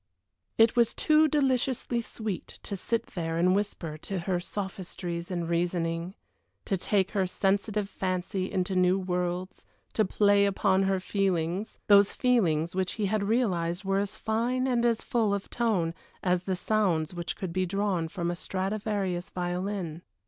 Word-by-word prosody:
It 225 0 +5
was 235 -2 +3
too 310 0 +4
deliciously 260 -4 +1
sweet 220 -4 -5 0.2
to 200 - -4
sit 230 +4 -1
there 165 -2 -2
and 180 +2 +4
whisper 185 -6 -2
to 190 +3 -3
her 180 0 0
sophistries 180 -2 -5
and 175 -3 -2
reasonings, 170 +1 -1 0.5
to - - 0
take 195 +1 +1
her 195 -3 +1
sensitive 200 +2 0
fancy 185 -1 -2
into 190 0 -1
new 185 +1 +4
worlds, 180 0 -2 0.3
to 215 - +3
play 200 0 +4
upon 190 -1 +2
her 190 -1 +1
feelings 185 0 -1
those 200 -1 +6
feelings 175 - +2
which 185 0 -1
he 215 - -1
realized 200 -5 0
were 195 0 +1
as 200 0 -3
fine 235 +4 0
and 245 -2 +2
as 230 -2 +2
full 220 -4 +1
of 200 - -6
tone 205 -9 +1 0.3
as 180 -1 +1
the 190 - 0
sounds 180 -5 +1
which 175 -1 -4
could 185 -3 -5
be 185 0 0
drawn 195 -3 0
from 170 +1 -2
a - - -3
Stradivarius 195 -1 -2
violin. 180 -2 -3
190 Hz, 155 wpm, -28 LUFS, 175-210 Hz, 0.5 s, those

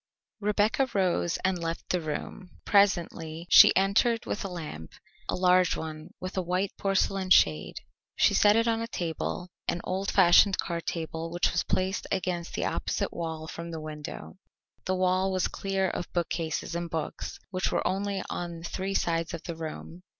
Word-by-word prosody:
Rebecca 210 +5 +1
rose 180 -3 +1
and 190 -1 +1
left 165 0 -4
the 180 - +1
room. 160 +4 -5 0.2
Presently 170 -5 +2
she - - +9
entered 210 +5 +2
with - - -3
a - - -3
lamp 155 - -7 0.4
a - - +1
large 180 0 +3
one 155 +1 -6
with 185 +1 -6
a 190 - +1
white 180 +2 -1
porcelain 195 -1 0
shade. 80 - +4 0.4
She - - +4
set 205 0 +5
it 230 +1 +3
on 225 0 +1
a 230 - -3
table, 175 -2 -3 0.2
an 170 - 0
old 190 +1 -2
fashioned 190 +1 +6
card 170 -2 -3
table 165 0 -3
which 175 +1 +1
was 175 - 0
placed 190 +1 -1
against 180 -3 -2
the - - -1
opposite - - -2
wall 160 -2 -4
from 170 +1 -7
the 165 -1 -5
window. 150 - -8 0.5
That 185 - 0
wall 185 +1 +2
was 185 -1 +1
clear 195 -1 -1
of 175 - -5
bookcases 165 -2 -2
and 170 0 -3
books, 160 -1 -4
which 185 -1 -1
were - - 0
only 195 +1 -1
on 170 -1 -5
three 190 +2 -3
sides 165 0 0
of 165 - -9
the 170 - -5
room. 165 +2 -7
180 Hz, 170 wpm, -28 LUFS, 165-195 Hz, 0.5 s, she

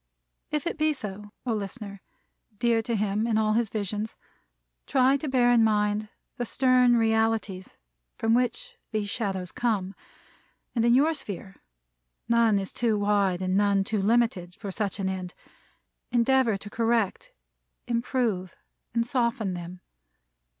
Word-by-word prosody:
If 300 +1 -2
it 335 - -3
be 310 0 +3
so, 210 -5 -7
O 240 - 0
listener, 200 -1 -6 0.6
dear 235 0 +2
to 230 +1 -2
him 210 +1 0
in 225 -2 +1
all 215 -1 +2
his 230 -1 +1
visions, 210 +1 -3 0.7
try 265 0 +4
to 295 - -5
bear 245 -2 +4
in 235 -2 +5
mind 210 -1 +1 0.3
the 245 - -2
stern 250 -1 +4
realities 220 -4 0 0.4
from 225 0 +1
which 475 - -1
these 210 -2 -2
shadows 190 -5 -3
come; 205 -6 -1 0.8
and 230 - +1
in 235 +1 +5
your 300 +5 +4
sphere 200 - -7 0.7
none 230 -3 +4
is 195 -1 -3
too 230 -3 +1
wide 200 -3 +1
and 185 0 0
none 200 -1 +3
too 210 +1 -1
limited 205 -5 +1
for 205 -2 -6
such 200 -1 -2
an 195 - -1
end 185 -1 -4 0.8
endeavor 240 -2 +3
to 205 +1 -9
correct, 230 - 0 0.5
improve 235 -6 -1 0.4
and 230 0 +2
soften 235 -6 0
them. 175 +1 -7
220 Hz, 145 wpm, -27 LUFS, 200-240 Hz, 0.8 s, in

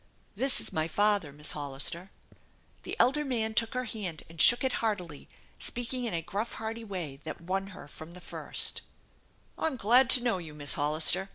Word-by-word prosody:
" - - -37
This 270 0 +2
is - - -3
my 160 0 -1
father, 205 -4 +1
Miss 150 +2 +2
Hollister." 145 +5 -2 0.7
The - - -7
elder 280 +5 +3
man 225 -5 -2
took 230 +1 +1
her 255 - -1
hand 205 -9 -6
and 165 -1 -3
shook 240 - +6
it 260 - 0
heartily, 180 -9 -4 0.3
speak 240 +1 0
ing 250 -1 -3
in 230 - -4
a 165 - -3
gruff, 200 +7 -4
hearty 225 +1 -6
way 175 -10 -7
that 160 - -7
won 190 +3 -3
her 185 -6 -12
from 160 +3 -11
the 180 - -12
first: - - 0 0.8
"I'm 320 -4 -1
glad 245 +4 +3
to 245 - +2
know 230 -7 0
you, 155 -3 -10
Miss 145 -1 +3
Hollister. 155 +6 +2
195 Hz, 195 wpm, -28 LUFS, 160-235 Hz, 0.8 s, shook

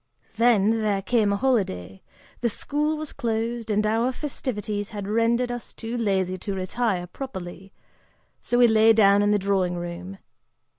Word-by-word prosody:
Then 225 -1 +3
there 200 -2 0
came 215 -2 +2
a - - +2
holiday, 185 - -1 0.4
the 240 - +1
school 300 +7 -1
was 310 -1 -6
closed, 230 0 -2
and 210 0 +1
our 225 +4 +1
festivities 215 -7 -4
had 205 -3 -6
rendered 230 +3 +1
us 245 -1 -7
too 225 +2 -6
lazy 190 -5 0
to 200 +1 -4
retire 190 0 -1
properly, 190 -3 -8 0.7
so 240 - -1
we 245 -1 +7
lay 220 0 +5
down 200 -2 +5
in 205 - +2
the 210 - +4
dining 190 -3 0
room. 175 +2 -6
215 Hz, 155 wpm, -24 LUFS, 195-235 Hz, 0.7 s, we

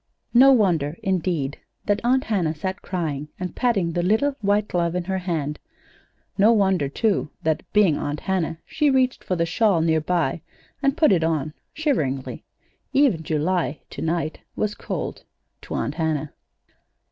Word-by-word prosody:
No 265 +3 +8
wonder, 175 - +2
indeed, 175 -7 -1 0.3
that 205 +1 +1
Aunt 260 +2 +3
Hannah 180 -8 0
sat 185 +5 -4
crying 150 -5 -3
and 180 -1 -4
patting 205 -9 +1
the 175 - -1
little 220 +11 +2
white 205 +1 +2
glove 170 -1 0
in 180 - -1
her 190 +1 -2
hand. 160 -5 -3 0.8
No 210 +3 +6
wonder, 190 -9 +2
too, 150 - 0
that 160 -1 +1
being 195 -8 +4
Aunt 145 0 -3
Hannah 175 -4 -1
she 300 -2 +1
reached 260 -1 +2
for 185 - -1
the 170 -1 +1
shawl 190 +2 +2
near 160 -1 +2
by 160 -2 0 0.4
and 275 +2 +1
put 310 - +5
it 175 -4 +3
on, 155 -2 -1 0.2
shiveringly. 155 - -1 0.5
Even 265 - +3
July, 160 0 -1
to - - -7
night, 160 -1 -1 0.2
was 210 -1 -1
cold - - -5 0.4
to - - -6
Aunt - - -1
Hannah. 155 -3 -2
175 Hz, 160 wpm, -23 LUFS, 155-210 Hz, 0.8 s, No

